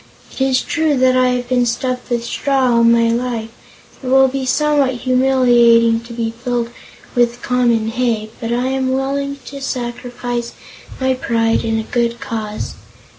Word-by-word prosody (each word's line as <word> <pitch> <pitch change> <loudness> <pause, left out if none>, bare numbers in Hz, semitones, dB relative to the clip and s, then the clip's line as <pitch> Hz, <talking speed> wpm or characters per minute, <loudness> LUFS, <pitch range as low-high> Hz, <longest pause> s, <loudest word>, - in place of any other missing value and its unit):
It - - -7
is 265 -1 +2
true 320 -2 0
I 255 -1 +3
have 245 0 -4
been 245 -1 +1
stuffed 250 +2 -2
with 235 -1 -1
straw 265 0 +1
all 235 - +4
my 230 0 +4
life 230 -1 -2 0.5
and 255 - -5
it - - -1
will 265 0 +6
be 265 0 -3
somewhat 290 -2 +2
humiliating 240 -3 +4
to 235 +1 -11
be 230 -1 -2
filled 240 -2 -1 0.4
with 240 0 +1
common 235 -3 +1
hay, 225 -3 -1
but 230 0 -4
I 245 +2 0
am 265 -1 0
willing 280 +1 -2
to 280 0 -8
sacrifice 245 -1 -4 0.5
my 260 0 +1
pride 230 -3 0
in 225 0 0
a 220 - -2
good 235 +1 -1
cause. 215 -2 -5
245 Hz, 165 wpm, -17 LUFS, 235-260 Hz, 0.5 s, will